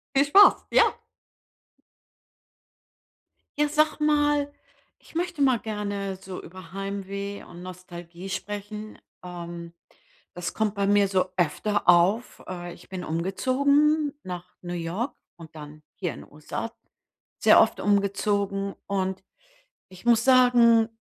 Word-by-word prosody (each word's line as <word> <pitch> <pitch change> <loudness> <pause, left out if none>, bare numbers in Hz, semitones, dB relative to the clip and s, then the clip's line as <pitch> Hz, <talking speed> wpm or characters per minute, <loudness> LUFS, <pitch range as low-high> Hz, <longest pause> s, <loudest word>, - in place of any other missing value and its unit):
Viel 275 +1 +5
Spaß, 395 +8 +6
ja. - - +6 2.8
Ja, 295 - +3
sag 305 +1 +1
mal, 295 -1 +2 0.5
ich - - -20
möchte 345 -2 -2
mal 260 -4 +4
gerne 205 -3 -4
so 190 -1 -9
über 180 -1 -12
Heimweh 200 0 -5
und 175 - -12
Nostalgie 180 0 -9
sprechen. 205 +3 -6 0.3
Ähm. 170 -1 -8 0.6
Das 175 0 -4
kommt 220 -1 -1
bei 200 -1 0
mir 205 -1 +4
so 190 -1 +2
öfter 185 +4 0
auf. 180 +7 +3
Äh, 175 -1 -6
ich - - -16
bin 185 -1 -6
umgezogen 280 - +1
nach 180 0 -8
New 175 0 -6
York 175 +10 -3 0.2
und 165 -2 -13
dann 150 0 -11
hier 175 - -3
in - - -11
'n - - -20
USA 155 +9 -6 0.7
sehr - - +6
oft - - +2
umgezogen 200 0 0
und 190 -1 -2 0.7
ich 185 +2 -15
muss 230 -1 +4
sagen, 245 -3 +5
200 Hz, 125 wpm, -25 LUFS, 180-235 Hz, 2.8 s, Spaß